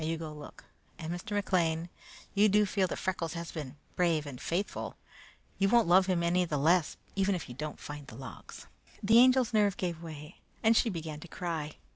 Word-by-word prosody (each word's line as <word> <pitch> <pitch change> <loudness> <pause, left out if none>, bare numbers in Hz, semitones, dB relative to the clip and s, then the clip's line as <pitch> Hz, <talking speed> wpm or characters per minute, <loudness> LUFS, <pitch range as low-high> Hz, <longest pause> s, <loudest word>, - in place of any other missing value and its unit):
Now, 155 - -2
you 165 0 -1
go 160 -1 -6
look; 150 -1 -11 0.3
and 160 +1 -4
Mr. 175 +4 -6
McLean, 170 -5 +1 0.5
you 210 +1 +5
do 210 +1 +4
feel 195 -1 +1
that - - -4
Freckles 175 -3 -2
has 170 -1 -5
been 150 -4 -6 0.2
brave 165 -4 +2
and 135 -2 -8
faithful? 180 +5 -2 0.6
You 195 0 +3
won't 235 -3 +4
love 185 +2 +6
him 180 -2 +1
any 175 +2 +3
the 155 -4 -1
less 165 +3 +3 0.2
even 195 0 +2
if 175 - -5
you 125 - -8
don't 150 +4 -6
find 145 -1 -8
the - - -10
logs." 130 +2 -10 0.4
The 220 +3 +6
Angel's 255 -1 +5
nerve 205 -3 +3
gave 170 -3 -3
way 155 0 -9 0.2
and 225 +1 +5
she 230 - +3
began 160 -5 -5
to 175 - -10
cry. 160 -3 -4
170 Hz, 205 wpm, -31 LUFS, 155-195 Hz, 0.6 s, love